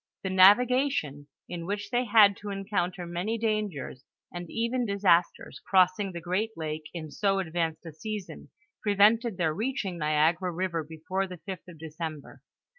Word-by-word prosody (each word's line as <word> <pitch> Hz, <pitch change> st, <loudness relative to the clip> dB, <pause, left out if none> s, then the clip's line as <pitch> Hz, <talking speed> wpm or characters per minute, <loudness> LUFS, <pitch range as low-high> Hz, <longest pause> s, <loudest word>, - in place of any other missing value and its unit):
The 190 Hz, -, -2 dB
navigation, 200 Hz, -, +4 dB, 0.2 s
in 170 Hz, -1 st, -6 dB
which 205 Hz, 0 st, -4 dB
they 245 Hz, +1 st, +1 dB
had 205 Hz, -3 st, +6 dB
to 205 Hz, -, -7 dB
encounter 195 Hz, -3 st, -2 dB
many 175 Hz, +7 st, -2 dB
dangers 210 Hz, -, -2 dB, 0.3 s
and 175 Hz, -1 st, -6 dB
even 235 Hz, +2 st, -1 dB
disasters 195 Hz, -5 st, +1 dB
crossing 190 Hz, +1 st, +3 dB
the 175 Hz, -, -6 dB
great 185 Hz, +6 st, -1 dB
lake 155 Hz, -1 st, -4 dB
in 160 Hz, -3 st, -7 dB
so 195 Hz, +2 st, +1 dB
ad 170 Hz, -4 st, -5 dB
vanced 165 Hz, -1 st, -2 dB
a 165 Hz, -, -7 dB
season, 205 Hz, +5 st, -7 dB, 0.3 s
prevented 210 Hz, +1 st, +3 dB
their 165 Hz, -4 st, +1 dB
reaching 210 Hz, -4 st, -3 dB
Niagara 160 Hz, +4 st, +2 dB
river 170 Hz, -2 st, -2 dB
be 160 Hz, +1 st, -12 dB
fore 190 Hz, +1 st, 0 dB
the 180 Hz, -1 st, -8 dB
5th 185 Hz, 0 st, -8 dB
of 175 Hz, -2 st, -12 dB
December. 155 Hz, -1 st, -7 dB
185 Hz, 160 wpm, -28 LUFS, 165-210 Hz, 0.3 s, had